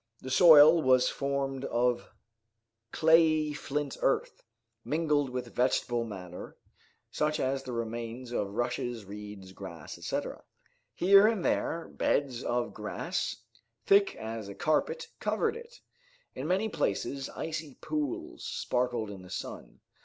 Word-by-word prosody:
The 130 - -7
soil 155 +2 +8
was 130 -2 +4
formed 140 -1 -2
of 120 0 0 0.8
clayey 155 -2 +4
flint 145 -1 -3
earth, - - 0 0.4
mingled 150 -3 +1
with 125 0 -5
vegetable 120 -1 +1
matter, 90 -5 -8 0.5
such 155 0 0
as 135 +1 0
the 130 - -7
remains 115 +1 -5
of 105 -4 -1
rushes, 120 -2 -2
reeds, 100 -1 -9
grass, 85 -5 -9
etc. - - -4 0.5
Here 195 +3 +7
and 220 -5 0
there 165 0 0
beds 130 -4 0
of 120 0 -1
grass, - - -3 0.4
thick 200 0 +4
as 110 -1 -6
a 100 - -8
carpet, 470 - 0
covered - - 0
it. 475 +1 -11 0.5
In 135 - -5
many 190 +5 +1
places 135 - -2
icy 155 -3 -5
pools 150 - -4
sparkled 120 -4 -1
in 95 -2 -9
the 90 - -13
sun. 90 - -7
130 Hz, 125 wpm, -30 LUFS, 115-155 Hz, 0.8 s, soil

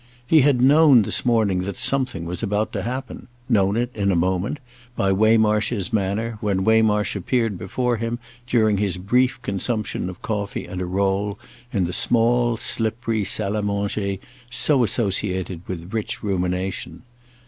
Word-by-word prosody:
He 155 +4 +5
had 135 -2 +3
known 140 -3 +6
this - - +1
morning 110 -6 +2
that 95 +1 -4
something 130 -11 +1
was 90 +1 -4
about 105 +1 -1
to 100 - -2
happen—known 120 -3 -2
it, 120 +1 -1
in 100 -2 +1
a - - +1
moment, 95 - 0 0.4
by 95 -4 +1
Waymarsh's 105 -1 +2
manner 105 +2 -1
when 100 -3 0
Waymarsh 110 -1 +2
appeared 115 +2 0
before 120 +7 -2
him 115 +1 -3 0.3
during 110 -4 +2
his 100 -3 -1
brief 125 +8 +1
consumption 105 -2 -2
of 90 - -11
coffee 105 -2 -3
and 90 -2 -6
a 90 - -3
roll 100 +2 -1 0.3
in 100 -5 0
the 90 - -4
small 120 +3 +2
slippery 115 -2 -1
salle 100 0 +1
à 105 -1 -1
manger 100 -1 -2 0.3
so 130 +1 +4
associated 95 -5 -1
with 90 +1 -7
rich 115 +4 -3
rumination. 95 +1 -3
105 Hz, 150 wpm, -22 LUFS, 95-120 Hz, 0.4 s, known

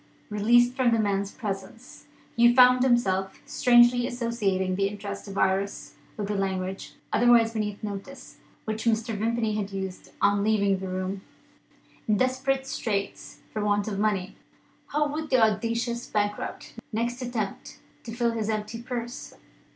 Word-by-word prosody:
Released 240 +4 +4
from 255 -2 +2
the 230 - +3
man's 200 -2 0
presence, 205 +2 -7 0.3
Hugh 240 +1 +5
found 250 -1 +7
himself 195 -7 +1
strangely 245 0 +4
associating 205 -6 -1
the 195 +1 +1
interests 200 0 -6
of 195 0 -7
Iris 195 +1 0 0.2
with 205 -2 -3
the 210 - -2
language 190 -1 -3 0.2
otherwise 230 0 +5
beneath 210 -2 -3
notice 210 +6 -7 0.3
which 220 +1 -3
Mr. 225 0 +1
Vimpany 225 +1 0
had 205 -2 -3
used 190 -1 -6
on 200 0 +3
leaving 200 -3 +2
the 190 - -5
room. 185 +1 -3 0.9
In 210 -1 +3
desperate 260 +2 0
straits 205 -6 -4
for 215 - -2
want 205 0 +1
of 200 -2 -3
money, 205 -3 0 0.5
how 295 +1 +1
would 305 +1 -4
the 260 - +4
audacious 230 +2 0
bankrupt 205 0 -3 0.2
next 240 +3 -2
attempt 235 -5 -4 0.3
to 230 - -7
fill 235 0 0
his 220 -2 -2
empty 215 +1 -3
purse? 240 -1 -6
215 Hz, 145 wpm, -26 LUFS, 200-240 Hz, 0.9 s, found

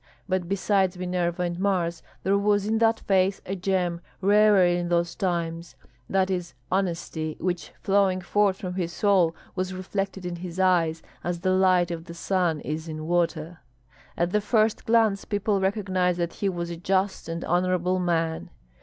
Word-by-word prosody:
But, 185 -2 -1
besides 195 -1 +1
Minerva 180 -1 -1
and 175 0 -3
Mars, 180 -4 0 0.2
there 195 +2 +2
was 205 0 +2
in 220 +1 +1
that 225 0 +3
face 190 0 +2
a 195 - -3
gem 180 -2 -1 0.2
rarer 205 -1 +5
in 175 0 +1
those 170 0 +1
times; 170 -4 -3 0.3
that 190 0 +1
is 180 -5 -3 0.2
honesty, 165 -4 -2
which 175 -1 -2
flowing 195 -2 +3
forth 195 +1 +1
from 185 -3 -5
his 175 -2 -2
soul 180 -4 +2 0.2
was 185 0 -3
reflected 195 0 -4
in 175 -1 -4
his 180 +1 -7
eyes 170 -4 +2 0.2
as 175 -1 -3
the 185 - +1
light 185 -2 +3
of 165 -1 -5
the 170 -1 -9
sun 175 -3 0
is 155 +2 -4
in 155 -1 -5
water. 170 -1 -1 0.6
At 175 +1 +1
the 210 - +2
first 215 +1 +1
glance 225 -3 +3
people 205 -1 0
recognized 190 -3 0
that 170 -1 -2
he 200 - -1
was 170 -2 -4
a 170 - -5
just 190 +1 -1
and 165 +1 -4
honorable 180 +1 +1
man. 165 -2 -1
180 Hz, 170 wpm, -26 LUFS, 170-195 Hz, 0.6 s, rarer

